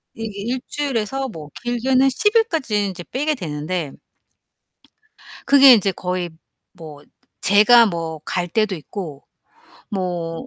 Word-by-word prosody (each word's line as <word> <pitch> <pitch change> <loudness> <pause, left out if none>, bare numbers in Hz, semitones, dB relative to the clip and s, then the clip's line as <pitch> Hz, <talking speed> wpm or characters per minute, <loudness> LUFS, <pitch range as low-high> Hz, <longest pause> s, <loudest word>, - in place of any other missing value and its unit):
이게 215 -3 -6
1 260 - -3
주일에서 270 -2 -2
뭐 155 -6 -10
길게는 255 +2 +2
10일까지 325 - +1
인제 180 -2 -7
빼게 295 +4 -1
되는데 155 - -4 1.5
그게 275 -2 +8
인제 200 -3 +3
거의 180 -1 -4 0.4
뭐 155 -4 -12 0.4
제가 230 +4 +6
뭐 165 -4 -4
갈 175 -1 -2
때도 215 +1 0
있고 155 -2 -8 0.7
뭐 175 +1 -4
200 Hz, 205 characters per minute, -20 LUFS, 170-255 Hz, 1.5 s, 그게